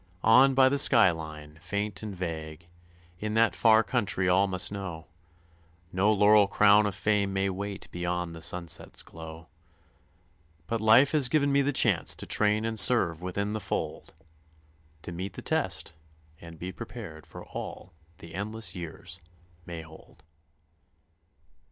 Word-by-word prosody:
On 130 +4 +5
by 130 0 +6
the 140 +2 +1
sky 115 -9 +6
line, 80 -1 -9
faint 100 +2 -4
and 105 -2 -6
vague, 80 -2 -6 0.5
in 105 +1 -3
that 115 -4 +3
Far 110 -1 +4
Country 100 -4 -1
all 95 +2 +3
must 95 0 -1
know, 90 -5 -6 0.9
No 95 +4 +2
laurel 105 0 +5
crown 105 +1 +4
of 100 - -4
fame 105 -2 0
may 95 0 0
wait 100 +1 -6
beyond 90 -1 -3
the 80 - -10
sunset's 85 0 -2
glow; 80 0 -11 1.2
But 115 -1 -3
life 115 +6 +5
has 145 -5 +4
given 140 0 +2
me 140 0 +3
the 140 +1 0
chance 110 - +2
to - - -7
train 105 +1 +1
and 115 -1 0
serve 90 -7 +4
within 100 +3 -3
the 110 - -4
fold, - - -5 0.9
To - - -7
meet 90 +2 -6
the - - -9
test - - -1 0.5
and 85 -1 -12
be 90 +3 -6
prepared 100 -8 -10
for - - -11
all - - -8 0.2
the 85 - -13
endless 110 +3 -5
years 90 0 -9 0.5
may 85 -1 -7
hold. 80 0 -17
100 Hz, 150 wpm, -27 LUFS, 85-110 Hz, 1.2 s, by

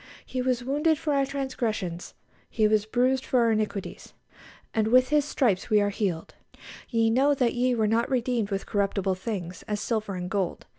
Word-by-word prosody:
"He 255 - -3
was 250 -1 0
wounded 295 +5 +1
for 305 -1 -1
our 275 -1 +2
transgressions, 230 -10 -3 0.3
He 215 -2 +2
was 215 0 +1
bruised 255 +3 +1
for 255 - +1
our 230 -1 +3
iniquities;... 215 -3 -3 0.6
and 220 -1 +1
with 255 +2 +4
His 300 -1 +3
stripes 225 -11 0
we 215 - +4
are 205 0 +1
healed." 185 -6 -3 0.6
"Ye 225 -1 +2
know 275 +5 +3
that 250 -3 +1
ye 250 0 +1
were 220 -2 +1
not 225 +2 +1
redeemed 245 -4 0
with 195 -1 -3
corruptible 195 -1 0
things, 185 -2 -5
as 210 -1 -2
silver 215 -4 -2
and 180 0 -4
gold... 190 -2 -2
225 Hz, 185 wpm, -26 LUFS, 205-255 Hz, 0.6 s, with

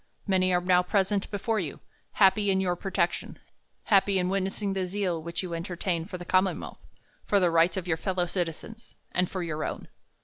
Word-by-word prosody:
Many 185 -2 +2
are 180 0 +2
now 180 0 +4
present 195 +2 0
before 215 +2 -1
you, 155 -7 -4 0.3
happy 200 +1 +4
m 190 -1 +3
your 180 -2 +1
protection, 175 -1 -2 0.5
happy 200 -2 +3
in 180 0 +1
witnessing 195 +1 -1
the 190 -1 -1
zeal 180 -3 -1
which 170 +3 -4
you 180 -2 -5
en 165 - -2
tertain 175 -1 -2
for 185 - -5
the 175 - -9
commonwealth, 185 +2 0 0.5
for 200 - +4
the 180 -3 +3
rights 170 +2 +3
of 185 -1 -3
your 160 -2 +1
fellow 185 +1 -1
citizens, 180 +6 -5 0.2
and 180 0 +1
for 185 -2 -3
your 155 -2 -3
own. - - -5
185 Hz, 195 wpm, -28 LUFS, 175-195 Hz, 0.5 s, now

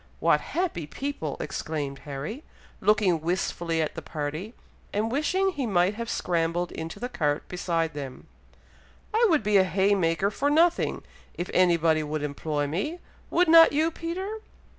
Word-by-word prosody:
"What - - +3
happy 330 - -2
people!" 215 - -4
exclaimed 145 -3 -4
Harry, 150 - -5 0.4
looking 195 -5 +3
wistfully 170 -1 -1
after 155 - -3
the - - -6
party, 155 +9 -5 0.4
and 215 +2 -1
wishing 370 +8 +1
he 275 -8 -3
might 185 -1 +2
have 230 +2 -5
scrambled 170 0 -1
into 160 +5 -6
the 245 - -3
cart 150 -11 -1
beside 165 -3 -1
them. 140 -3 -7 0.9
"I 460 +2 +4
would 310 -9 +3
be 210 -1 +4
a 190 - +6
haymaker 190 0 +2
for 285 +6 0
nothing, 335 +3 +2 0.3
if 175 - -4
anybody 170 -3 +3
would 150 0 -3
employ 145 0 -2
me; 195 - -2 0.3
would 355 +1 +3
not 330 -1 +8
you, 315 +3 +2
Peter?" 375 +7 -4
185 Hz, 150 wpm, -26 LUFS, -, 0.9 s, not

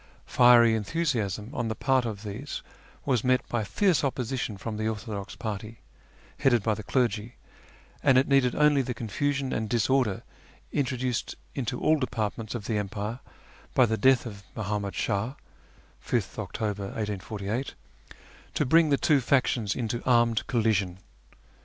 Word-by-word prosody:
Fiery 120 -2 +6
enthusiasm 110 - -1
on 120 -5 -2
the 110 - -2
part 130 -1 +2
of 105 -2 -5
these 110 +7 -6 0.4
was 125 -5 +1
met 130 -1 +2
by 120 -2 -1
fierce 170 - +2
opposition 125 -5 -2
from 105 +2 -5
the 110 0 -1
orthodox 105 -2 -5
party, 110 +1 -5 0.6
headed 120 -5 +3
by 110 - +2
the 110 - -5
clergy, 115 0 -1 0.7
and 130 - +5
it 130 - +4
needed 135 -3 +3
only 150 -2 +4
the 125 -1 -4
confusion 135 +5 -1
and 110 -1 -2
disorder 120 -2 +1 0.5
introduced 130 -3 -1 0.2
into 125 -2 -3
all 155 0 +3
departments 110 -3 -3
of 110 -4 -5
the 105 -1 0
empire 105 +3 -4 0.6
by 130 - +6
the 110 -1 0
death 130 +4 +4
of 100 -4 -7
Muhammad 105 -2 -3
Shah 110 +5 -1 0.7
(5th - - -2
October 105 -2 -3
1848) 105 +3 -4 0.8
to - - +1
bring 160 +4 +5
the 140 - +3
two 145 -1 +3
factions 120 -4 +1
into 120 -1 -2
armed 120 -3 +3
collision. 105 -6 +1
115 Hz, 145 wpm, -27 LUFS, 105-130 Hz, 0.8 s, Fiery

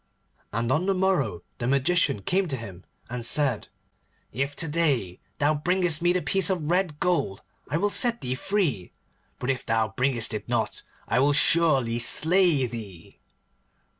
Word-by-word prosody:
And 115 +3 -2
on 160 +7 +1
the 195 - +2
morrow 145 - 0 0.2
the 120 - -2
Magician 140 - +1
came 190 - 0
to 135 -4 -3
him, 95 -6 -10 0.2
and 120 0 -6
said, 130 -1 0 0.6
'If 135 +5 -3
to 165 - -3
day 145 - 0 0.2
thou 145 +2 +2
bringest 170 +1 0
me 175 0 +3
the 180 0 -1
piece 195 -1 +1
of 170 -4 -1
red 175 -5 0
gold 170 - -1 0.3
I 150 - 0
will 205 +4 0
set 235 +1 +2
thee 125 0 -2
free, 140 - -2 0.4
but 125 - -1
if 130 - -4
thou 110 -1 0
bringest 125 0 0
it 105 - -6
not - - -1 0.3
I 125 - +1
will 145 +2 +3
surely 135 -7 +4
slay 160 +2 +4
thee. 105 -8 -9
140 Hz, 165 wpm, -25 LUFS, 115-175 Hz, 0.6 s, surely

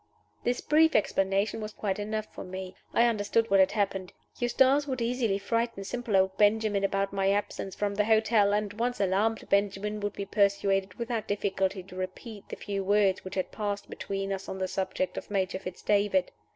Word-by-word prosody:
This 245 0 0
brief 320 +2 +4
explanation 195 +1 +1
was 215 0 -5
quite 200 -1 -2
enough 215 +1 -2
for - - -7
me 185 0 -7 0.2
I 235 - +4
understood 225 0 +1
what 195 - +6
had 190 0 +4
happened. 195 -3 -1 0.3
Eustace 265 +4 +3
would 260 -2 -2
easily 235 -3 0
frighten 230 +1 -1
simple 220 0 -1
old 190 0 +2
Benjamin 210 -1 +3
about 195 0 0
my 195 -1 +1
absence 200 -1 -2
from 205 -1 -1
the 210 +1 +1
hotel; 220 -2 +4
and, 205 0 0
once 240 +2 -2
alarmed, 200 +3 +1
Benjamin 200 +1 +1
would 205 0 -2
be 200 - -5
persuaded 195 -1 +1
without 235 -2 -3
difficulty 195 -2 -1
to 185 0 -13
repeat 195 +3 -7
the - - -5
few 200 -1 -4
words 200 -1 +2
which 185 - -7
had 185 - -2
passed 205 -2 -4
between 195 0 -3
us 195 0 -6
on 190 - -4
the 190 0 -1
subject 190 0 -2
of - - -15
Major 190 -2 -1
Fitz 185 -1 -8
David. 210 +7 +2
205 Hz, 190 wpm, -29 LUFS, 195-220 Hz, 0.3 s, what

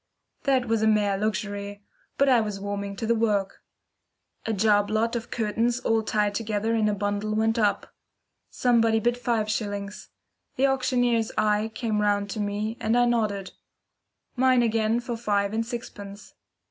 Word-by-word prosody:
That 265 -3 +2
was 225 -1 +1
a 220 - +3
mere 210 -2 +2
luxury, 205 0 -3 0.3
but 280 - +3
I 250 -3 +5
was 210 -2 -4
warming 200 0 -4
to 225 - -4
the 235 - +2
work. 210 -4 0 0.9
A - - 0
job 205 0 +2
lot 225 +2 0
of 235 +1 -4
curtains 230 +2 0
all 225 -2 +1
tied 210 -1 0
together 220 +1 -1
in 220 -2 +2
a 205 - 0
bundle 205 +1 -2
went 225 +1 +1
up. 205 -2 0 0.6
Somebody 230 -2 +2
bid 240 +2 +1
five 235 -3 -1
shillings. 205 -1 -4 0.5
The 270 - +2
auctioneer's 245 -4 +1
eye 215 0 +1
came 220 -4 -1
round 205 -1 +1
to 215 - -4
me, 210 +2 -2
and 230 0 +1
I 245 - +4
nodded. 210 -5 -1 0.8
Mine 255 -1 +4
again 225 0 +1
for 240 -1 -4
five 205 -3 0
and 225 +1 0
sixpence. 205 -3 -8
220 Hz, 160 wpm, -26 LUFS, 205-235 Hz, 0.9 s, I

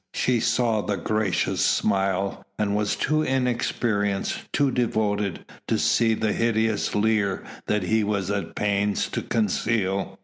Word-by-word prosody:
She 125 -2 +2
saw 115 -1 +1
the 100 -1 -2
gracious 105 -5 0
smile 95 -1 +1
and 105 -1 0
was 105 0 0
too 155 0 +1
inexperienced, 120 -6 -1
too 140 -2 +2
devoted, 105 -5 -1 0.2
to - - +1
see 115 -1 +3
the 110 -1 0
hideous 110 -1 0
leer 105 -2 +1 0.2
that 105 -2 +1
he 110 +4 +2
was 100 -2 -1
at 100 -1 -3
pains 100 0 0
to - - -3
conceal. 100 -2 -1
105 Hz, 135 wpm, -24 LUFS, 100-115 Hz, 0.2 s, see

